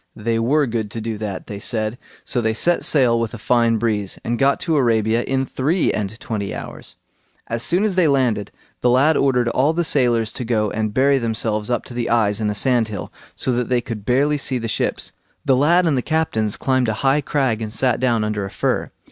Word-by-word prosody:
they 115 +1 -1
were 140 +6 +2
good 115 -3 -3
to 115 - -6
do 110 0 -4
that, 105 -3 -5
they 100 -1 -7
said, 110 +1 -1 0.3
so 120 - -1
they 110 -1 0
set 175 +9 +2
sail 125 -6 +3
with 115 0 -3
a - - -7
fine 115 +1 +2
breeze, 105 -4 -1
and 120 +1 -1
got 140 +1 +3
to 165 -3 0
Arabia 115 -4 +2
in 135 0 0
three 155 +8 0
and 105 +2 -4
twenty 105 -6 -4
hours. - - -7 0.5
As 115 0 -4
soon 180 - +1
as 215 -2 +1
they 180 -3 +3
landed, 125 -7 +1 0.3
the 125 - +2
lad 140 +6 +4
ordered 125 -4 +2
all 140 +6 +2
the 175 +1 0
sailors 120 -8 +1
to - - -5
go 110 -3 0
and 110 -1 -2
bury 135 +4 +3
themselves 110 -2 -2
up 120 - -1
to - - -10
the 120 -1 -2
eyes 110 -2 +2
in 105 - 0
a 105 - -2
sandhill, 115 -4 0 0.2
so 130 - -1
that 120 -1 -1
they 125 -1 +2
could 115 -4 -6
barely 140 +6 +1
see 130 -2 -1
the 115 -1 -4
ships. 110 - -2 0.3
The 135 - +4
lad 170 +7 +3
and 155 -4 +2
the 130 - +1
captains 120 -9 0
climbed 130 -2 +1
a - - 0
high 135 +3 +3
crag 130 -5 0
and 110 -1 -4
sate 125 +1 +1
down 120 -4 +1
under 105 -1 -2
a 100 - -5
fir. - - -1
120 Hz, 225 wpm, -20 LUFS, 110-135 Hz, 0.5 s, lad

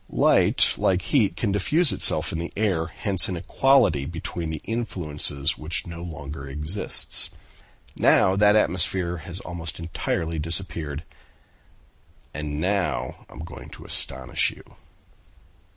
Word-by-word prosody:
Light, - - +2
like 95 -1 +1
heat, 105 -11 +1
can 105 - -1
diffuse 140 - +2
itself - - +7
in 80 - -4
the 85 - -6
air; 95 -7 0
hence 95 +2 +4
an 90 - -4
equality 120 - +2
between 85 0 -6
the 80 -1 -5
influences 75 -11 0
which 80 +3 -2
no 85 -1 -9
longer 75 -4 -8
exists, 75 +8 0 0.7
now 95 - +3
that 105 +1 +4
atmosphere 90 -3 0
has 85 +3 -7
almost 85 -1 -6
entirely 85 -1 -4
disappeared. 80 -2 0 1.3
And 75 0 -5
now 90 -8 -3
I - - -15
am - - -10
going 80 - -11
to - - -13
astonish 65 -1 -2
you." - - -14
85 Hz, 130 wpm, -23 LUFS, 75-95 Hz, 1.3 s, itself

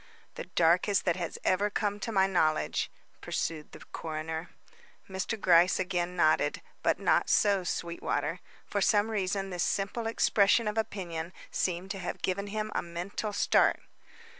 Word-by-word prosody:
"The - - -7
darkest 175 +4 +3
that 175 - +2
has 170 -3 -4
ever 200 +3 +2
come 205 0 -1
to 225 - -4
my 190 -3 +4
knowledge," 160 -5 +1 0.3
pursued 155 -2 -3
the - - -12
coroner. 160 +1 -4 0.6
Mr. 190 +4 -3
Gryce 175 -1 +5
again 180 -1 -1
nodded; 155 -3 +2 0.2
but - - +2
not - - +2
so, 200 -3 +3
Sweetwater. 170 -1 -2 0.3
For - - -2
some 210 +1 +3
reason 195 -1 -1
this 180 -1 -3
simple 205 +5 -1
expression 220 0 +3
of 210 - -1
opinion 175 -5 -4 0.2
seemed 180 +1 -1
to 195 - -5
have 180 - -5
given 200 +2 -1
him 215 +1 -3
a - - 0
mental 175 +5 -4
start. 200 - +3
185 Hz, 150 wpm, -30 LUFS, 170-205 Hz, 0.6 s, Gryce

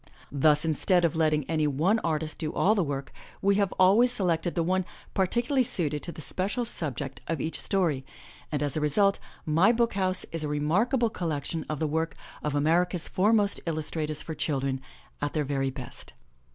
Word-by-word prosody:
Thus, 150 +2 +3
instead 175 +3 +2
of 165 - 0
letting 155 -3 +1
any 155 -2 +1
one 165 +10 +2
artist 160 -4 -2
do 155 -2 -2
all 210 - +3
the 200 -4 +1
work, 140 -2 -4 0.3
we 200 +1 +3
have 200 - +1
always 210 +7 +6
selected 175 -6 0
the 170 - +1
one 185 +2 +1 0.3
par 190 -1 +2
ticularly 245 +5 +1
suited 150 -9 -2
to 170 - -6
the 160 - -9
special 200 - -2
subject 145 - -4
of 165 - -2
each 160 - -2
story 170 -9 0 0.5
and, 150 -1 -1
as 145 -2 -2
a 155 - -1
result, 195 +7 +3 0.3
My 165 +8 +4
BOOK 235 0 +1
HOUSE 185 -1 +2
is 165 -1 -3
a - - -1
remarkable 205 - +1
collection 160 -2 -3
of 155 - -2
the 155 - -1
work 160 0 -1 0.3
of 150 -1 -2
America's 170 +4 +1
foremost 205 +1 +2
illustrators 155 -1 -2
for 160 - -5
children, 135 -4 -1 0.4
at 145 0 -2
their 150 -2 0
very 135 -1 0
best. 130 -1 -9
160 Hz, 185 wpm, -27 LUFS, 150-190 Hz, 0.5 s, always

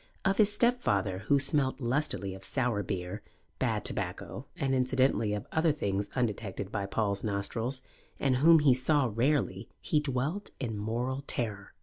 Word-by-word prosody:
Of 195 0 +2
his 210 -1 +5
stepfather, 105 - +1
who 140 - +4
smelt 135 -1 +2
lustily 120 -6 0
of 95 0 -9
sour 120 -2 0
beer, 90 -3 -4 0.4
bad - - 0
tobacco 130 +3 -3
and 135 -1 0
incidentally 130 -3 +2
of 105 - -5
other 160 0 +3
things 100 -8 -2
undetected 105 -5 -2
by 100 -3 -2
Paul's 100 -1 -1
nostrils, 115 +5 -1 0.4
and 130 -2 +2
whom 165 +5 +7
he 140 -3 +6
saw 130 0 +2
rarely, 135 +5 0
he 150 - +1
dwelt 150 +7 -2
in 115 -5 -3
mortal 120 +6 -2
terror. 105 -4 -2
125 Hz, 150 wpm, -30 LUFS, 105-140 Hz, 0.4 s, whom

